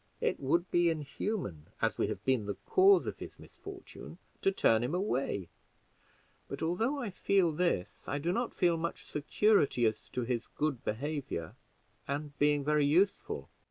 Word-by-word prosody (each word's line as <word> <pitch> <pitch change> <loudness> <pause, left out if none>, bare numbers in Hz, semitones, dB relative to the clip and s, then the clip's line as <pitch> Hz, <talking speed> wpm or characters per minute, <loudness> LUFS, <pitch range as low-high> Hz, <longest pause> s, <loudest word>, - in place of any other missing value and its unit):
It - - 0
would 170 +6 +1
be 175 0 +4
inhuman, 155 - -3
as - - 0
we - - +2
have - - -5
been 130 -6 +1
the 100 - -2
cause 385 +1 +5
of - - -5
his - - -9
misfortune, 395 -1 -11 0.2
to 195 - +3
turn 115 -11 +3
him 135 +8 -1
away; 135 - -1 1.0
but - - -5
although 220 - 0
I 240 -7 -3
feel 185 -2 +2
this, 150 - -1
I 140 - -1
do 165 +4 -1
not 240 +5 -1
feel 175 -3 +3
much 170 +1 -4
security 150 - +2
as 110 -1 -1
to 125 - -2
his 120 -1 -2
good 145 -5 -2
behavior 130 - -3 0.5
and 145 +1 -3
being 145 0 +3
very 150 -1 +3
useful. 180 +7 +1
150 Hz, 160 wpm, -32 LUFS, 130-185 Hz, 1.0 s, cause